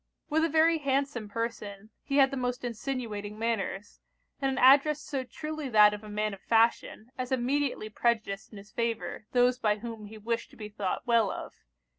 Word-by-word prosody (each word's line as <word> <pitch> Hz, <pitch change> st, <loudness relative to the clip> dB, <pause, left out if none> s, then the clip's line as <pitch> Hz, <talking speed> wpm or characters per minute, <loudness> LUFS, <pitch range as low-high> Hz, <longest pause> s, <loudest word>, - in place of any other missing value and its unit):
With 315 Hz, +1 st, +3 dB
a 330 Hz, -, +2 dB
very 320 Hz, +1 st, +4 dB
handsome 275 Hz, -5 st, -1 dB
person, 215 Hz, -2 st, -5 dB
he 275 Hz, -, -2 dB
had 270 Hz, -1 st, +5 dB
the -, -, -3 dB
most 250 Hz, 0 st, -2 dB
insinuating 225 Hz, -4 st, -4 dB
manners, 210 Hz, -3 st, -3 dB, 0.4 s
and 270 Hz, -, +2 dB
an 265 Hz, -, -2 dB
address 280 Hz, +3 st, +6 dB
so 275 Hz, -3 st, -4 dB
truly 305 Hz, +2 st, -6 dB
that 210 Hz, -2 st, +6 dB
of 210 Hz, +1 st, -7 dB
a 215 Hz, -, -9 dB
man 210 Hz, 0 st, -1 dB
of 195 Hz, -, -10 dB
fashion, 230 Hz, 0 st, +1 dB
as 255 Hz, 0 st, -3 dB
immediately 260 Hz, -1 st, 0 dB
prejudiced 215 Hz, -2 st, -1 dB
in 215 Hz, -, -11 dB
his 200 Hz, +1 st, -13 dB
favour 230 Hz, -1 st, -3 dB
those 250 Hz, 0 st, +3 dB
by 210 Hz, -1 st, +2 dB
whom 225 Hz, -1 st, -7 dB
he 220 Hz, +1 st, -11 dB
wished 230 Hz, +2 st, -3 dB
to -, -, -18 dB
be 210 Hz, -1 st, -7 dB
thought 205 Hz, -3 st, -3 dB
well 230 Hz, -4 st, +3 dB
of. -, -, -6 dB
235 Hz, 190 wpm, -29 LUFS, 210-270 Hz, 0.4 s, address